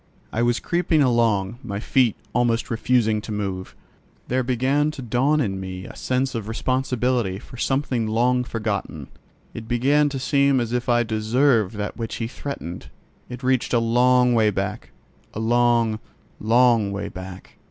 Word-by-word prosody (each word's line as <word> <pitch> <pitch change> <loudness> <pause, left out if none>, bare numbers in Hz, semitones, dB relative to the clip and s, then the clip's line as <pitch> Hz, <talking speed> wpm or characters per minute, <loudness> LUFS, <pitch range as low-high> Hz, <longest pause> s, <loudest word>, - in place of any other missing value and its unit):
I 110 - 0
was 120 0 +2
creeping 170 -3 +1
along, 115 -4 +1
my 100 -4 -4
feet 120 0 +2 0.2
almost 120 -1 +1
refusing 115 -2 +1
to 110 - -8
move. 95 -3 -4 0.5
There 130 +1 +1
began 130 +4 +1
to 155 -3 -7
dawn 130 +6 +1
in 95 -8 -1
me 95 0 -6
a - - -10
sense 130 +1 -1
of 115 -4 -4
responsibility 125 -3 -1
for 125 - -12
something 130 -3 0
long 125 +3 +2
forgotten. 105 - -4 0.4
It 115 -1 -8
began 140 +5 +2
to 140 - -4
seem 140 0 +2
as 120 -1 -2
if 125 0 -1
I 120 0 +3
deserved 110 0 +1
that 105 0 -4
which 115 -2 -4
he 115 - -3
threatened: 120 - -7 0.4
it 125 +1 -8
reached 130 -1 +1
a - - +4
long 125 +2 +3
way 110 -2 +4
back—a 105 +1 -7
long, 115 -1 +2 0.4
long 115 -2 +3
way 100 +1 -4
back. 95 0 -10
120 Hz, 155 wpm, -23 LUFS, 110-125 Hz, 0.5 s, a